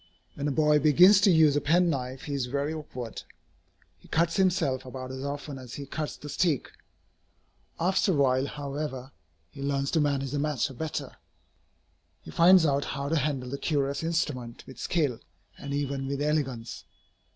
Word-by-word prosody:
When 145 0 -3
a - - 0
boy 150 +1 +3
begins 180 +7 +6
to 200 - +5
use 160 -4 +5
a 145 - +2
penknife, 145 -6 +1
he 145 - -5
is 135 -3 -1
very 140 +4 -2
awkward. 130 -7 -7 0.8
He - - -19
cuts 165 +1 +1
himself 175 -9 +1
about 130 0 -7
as 130 0 -6
often 140 0 -5
as 125 -2 -9
he 140 - -6
cuts 150 +2 -4
the 150 - -10
stick. 150 -2 0 1.1
After 190 +3 +2
a - - 0
while, 135 -1 +2
however, 140 -2 -5 0.4
he 135 - -10
learns 140 0 -1
to 165 - +2
manage 140 -2 0
the 145 - -1
matter 145 -2 -1
better. 145 0 -5 1.1
He - - -10
finds 175 - +6
out 140 -1 +1
how 140 +1 -4
to 165 - +1
handle 135 -4 -1
the 140 - -4
curious 140 -3 0
instrument 150 -8 -2
with 130 - -12
skill 145 -9 0 0.4
and 140 - -8
even 140 -1 -2
with 140 0 -3
elegance. 145 -6 -2
140 Hz, 170 wpm, -28 LUFS, 135-155 Hz, 1.1 s, begins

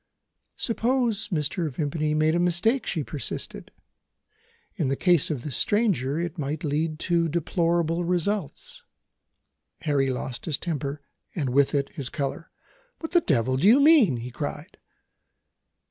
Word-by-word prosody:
"Suppose 235 -2 0
Mr. 160 -1 -1
Vimpany 150 +2 -1
made 155 +1 +2
a 170 - +1
mistake," 180 +8 +1
she 160 -5 -1
persisted. 145 0 -5 1.0
"In 165 -9 -1
the 135 - 0
case 175 -1 +3
of 140 -6 -3
this 145 - -2
stranger, 170 - +1
it 170 0 -4
might 150 +3 -3
lead 155 +1 -1
to 170 -2 +1
deplorable 170 +1 0
results." 195 - -2 1.0
Lord - - -14
Harry 140 -3 +2
lost 125 -1 -4
his 155 -4 -1
temper, 145 -4 -4 0.3
and 140 -7 -1
with 140 +2 +3
it 140 -1 0
his 140 -6 -6
colour. 150 +3 -4 0.5
"What 320 - -7
the 350 -1 +4
devil 130 - +1
do 165 +9 +3
you 240 +6 +7
mean?" 280 - +5
he 120 +2 -7
cried. 145 - -6
160 Hz, 145 wpm, -25 LUFS, 140-180 Hz, 1.0 s, you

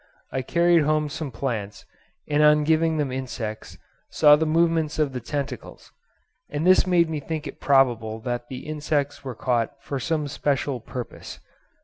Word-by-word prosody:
I 130 - -1
carried 170 +5 +3
home 150 0 +1
some 155 0 -5
plants, 110 -6 -4 0.4
and 150 0 +2
on 150 0 +5
giving 160 +1 +2
them 145 -3 -1
insects 125 -4 -5 0.3
saw 150 -1 +6
the 160 +1 0
movements 165 -1 +1
of 150 -3 0
the 125 - -3
tentacles, 140 +3 -6 0.6
and 150 +2 -2
this 185 0 +5
made 175 -2 +4
me 160 -2 -3
think 155 +1 -5
it - - -9
probable 120 -5 +2
that 120 0 -4
the 130 +2 -8
insects 145 -2 -2
were 130 -3 -6
caught 120 +3 -1
for 140 0 -5
some 155 +1 -1
special 140 -2 -1
purpose. 120 +1 -8
145 Hz, 160 wpm, -24 LUFS, 130-155 Hz, 0.6 s, saw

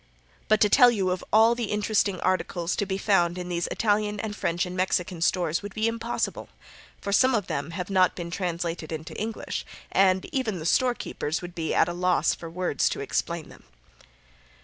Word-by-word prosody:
But 215 - +4
to 210 - +6
tell 245 +4 +7
you 195 -6 0
of 180 - -3
all 225 +2 +6
the 235 -1 -2
interesting 210 -2 0
articles 185 -1 0
to 205 - -1
be 190 0 -1
found 180 -4 +2
in 180 0 -5
these 175 -1 -1
Italian, 210 -1 0
and 210 -1 -4
French 175 -1 -1
and 180 0 -6
Mexican 180 -2 -1
stores, 170 -2 +1
would 205 -1 -8
be 220 +1 +1
impossible, 230 +1 -3 0.5
for 200 - -4
some 255 +5 +4
of 210 -4 0
them 140 -2 -3
have 180 +1 -4
not 185 -1 +3
been 170 -1 -6
translated 170 -3 -3
into 160 0 -6
English, 220 +1 -4 0.3
and 190 -1 +3
even 235 -8 -1
the 155 - -6
storekeepers 180 -7 0
would 175 0 -7
be 165 -2 -2
at - - +4
a 175 - -3
loss 180 0 +2
for 165 - -8
words 170 -5 0
to - - -4
explain - - -2
them. - - -15
185 Hz, 195 wpm, -26 LUFS, 175-210 Hz, 0.5 s, tell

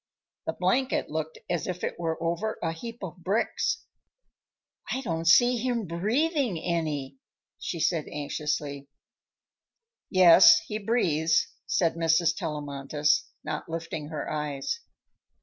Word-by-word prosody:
The - - 0
blanket 260 - 0
looked 160 0 -3
as 175 -4 -2
if 180 -1 -4
it - - -3
were 165 -1 -1
over 170 +7 -1
a 165 - 0
heap 230 +7 -8
of 185 -1 -6
bricks. 190 +5 -1 1.1
"I 265 - -1
don't 165 -8 -3
see 245 +8 +6
him 235 -2 -1
breathing 230 - 0
any," 150 -5 -2 0.4
she 170 - -4
said 160 -1 +1
anxiously. 145 -1 -3 1.2
"Yes, 180 -2 +8
he 210 +6 -5
breathes," 165 -8 +2 0.2
said 170 -3 +2
Mrs. 165 0 +2
Tellamantez, 145 0 -1 0.2
not 155 0 -4
lifting 160 -2 -4
her 155 -2 -5
eyes. 150 - -3
165 Hz, 120 wpm, -27 LUFS, 150-200 Hz, 1.2 s, Yes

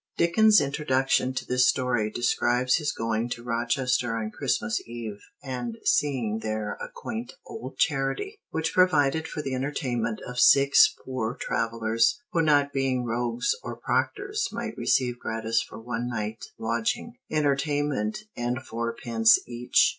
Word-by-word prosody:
[Dickens' 210 +5 +5
introduction 135 -2 +1
to 130 - -3
this 125 0 +3
story 125 -5 +1
describes 125 +2 +1
his 150 -2 -1
going 115 -1 -2
to 120 -1 -5
Rochester 120 0 0
on 110 -1 -3
Christmas 230 - -1
Eve 115 -3 -6 0.2
and 125 -4 -4
seeing 120 -7 +1
there 110 -1 -3
a - - -5
quaint 115 +2 -6
old 130 +3 -8
charity, 140 - 0
which 160 +1 -2
provided 160 -4 +3
for 150 - -5
the 135 - -3
entertainment 125 -4 -2
of 125 0 -4
"six 140 +3 +7
poor 125 -2 -3
travelers 115 - +1
who 165 - +2
not 145 -2 +3
being 130 -2 0
rogues 120 +1 0
or - - -6
proctors 415 +1 -1
might - - -4
receive 125 -2 +1
gratis 110 0 -1
for - - -9
one 120 +1 -3
night 110 -1 -4
lodging, 115 - -2 0.2
entertainment 145 - 0
and 120 +2 -2
fourpence 115 0 +2
each." 120 0 +3
125 Hz, 140 wpm, -26 LUFS, 115-140 Hz, 0.2 s, six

